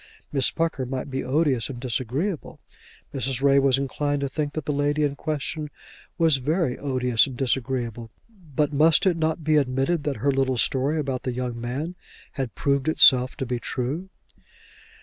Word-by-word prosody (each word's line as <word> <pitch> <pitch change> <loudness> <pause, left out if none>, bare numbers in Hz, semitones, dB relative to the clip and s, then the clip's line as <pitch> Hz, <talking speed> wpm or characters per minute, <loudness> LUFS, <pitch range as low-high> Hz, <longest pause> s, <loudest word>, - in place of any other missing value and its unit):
Miss 135 -3 +3
Pucker 160 -6 -2
might 135 +2 -4
be 135 0 -2
odious 135 -3 +1
and 125 -3 -6
disagreeable; 130 - -3 0.5
Mrs. 135 -1 -2
Ray 140 0 +5
was 135 -1 +3
inclined 145 +1 -1
to 140 - 0
think 145 +1 -3
that 155 -3 -4
the 150 - -1
lady 145 +1 +1
in 145 -1 0
question 150 +1 -3 0.5
was 165 -5 +4
very 145 0 0
odious 125 -3 +1
and 130 -3 -8
disagreeable; 120 -3 -2 0.5
but 150 +1 +1
must 155 +5 +4
it 185 -3 +3
not 160 0 -1
be 155 0 +3
admitted 135 +4 +1
that 145 -2 -1
her 140 +6 +1
little 135 -1 +1
story 135 +5 +1
about 135 -4 -2
the 125 - -3
young 120 -1 -4
man 135 +8 -3 0.4
had 130 -5 -4
proved 140 -1 0
itself 130 -5 +5
to 130 - -2
be 125 -1 -2
true? 140 +11 -3
135 Hz, 170 wpm, -24 LUFS, 130-150 Hz, 0.5 s, Ray